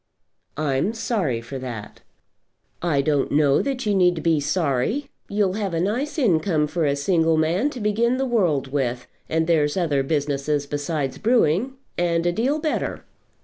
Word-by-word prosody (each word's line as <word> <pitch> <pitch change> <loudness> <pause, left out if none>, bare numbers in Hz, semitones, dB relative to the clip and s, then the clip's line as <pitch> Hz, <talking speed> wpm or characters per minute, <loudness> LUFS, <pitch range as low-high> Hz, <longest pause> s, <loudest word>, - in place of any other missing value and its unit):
"I'm 150 +6 0
sorry 185 - -1
for 130 +3 -7
that." 120 -5 -7 0.8
"I 150 -5 +1
don't 145 -2 +1
know 145 -1 +3
that 265 -3 -3
you 210 - +2
need 180 -4 +2
be 165 -2 +3
sorry. 160 - -1 0.2
You'll 200 -2 +1
have 200 -4 -2
a - - 0
nice 240 - -1
income 175 - +2
for 165 +1 -1
a 140 -1 +2
single 165 +1 +2
man 170 - +1
to 260 - -8
begin 230 +4 +1
the 270 - 0
world 170 - +1
with, 125 -3 -1 0.2
and 160 0 +1
there's 155 -1 +2
other 155 -6 +1
businesses 145 0 -1
besides 145 -1 -3
brewing, 230 - +2 0.3
and 170 -1 +1
a 175 - +3
deal 250 - 0
better." 310 0 -2
165 Hz, 160 wpm, -23 LUFS, 145-210 Hz, 0.8 s, know